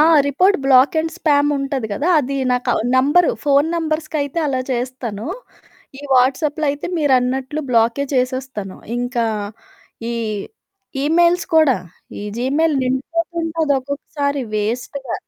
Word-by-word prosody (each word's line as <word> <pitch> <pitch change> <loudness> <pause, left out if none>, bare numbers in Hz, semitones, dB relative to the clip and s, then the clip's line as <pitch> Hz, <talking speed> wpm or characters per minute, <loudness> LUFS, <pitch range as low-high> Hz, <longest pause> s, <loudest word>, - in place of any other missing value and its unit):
ఆ! - - +7 0.2
Report 365 +9 +3
black 265 +2 +5
and 320 0 -3
spam 290 -3 +3
ఉంటది 275 -4 -2
గదా! 290 - -1
అది 275 +1 -3 0.2
నాకు 250 0 0 0.3
నంబరు 290 +7 +4
ఫోను 285 +1 +3
నంబర్స్‌కైతే 310 -2 -2
అలా 265 -3 0
చేస్తాను. 245 -3 -4 0.7
ఈ - - -9
వాట్సాప్‌లో 285 +4 +2
అయితే 290 +1 -5
మీరన్నట్లు 265 0 +1
బ్లాకే 235 +4 +2
చేసేస్తాను. 255 -6 -2 0.2
ఇంకా 245 -1 -1 0.9
ఈ - - -2 0.9
ఈమెయిల్స్ 345 +3 +3
కూడా. 290 -7 +5 0.4
ఈ - - -6 0.2
జీమెయిల్ 290 +4 +1
నిండిపోతుంటది 325 +3 -1
ఒక్కొక్కసారి 280 +1 -3
వేస్ట్‌గా. 240 +4 -3
280 Hz, 115 wpm, -19 LUFS, 255-310 Hz, 0.9 s, ఆ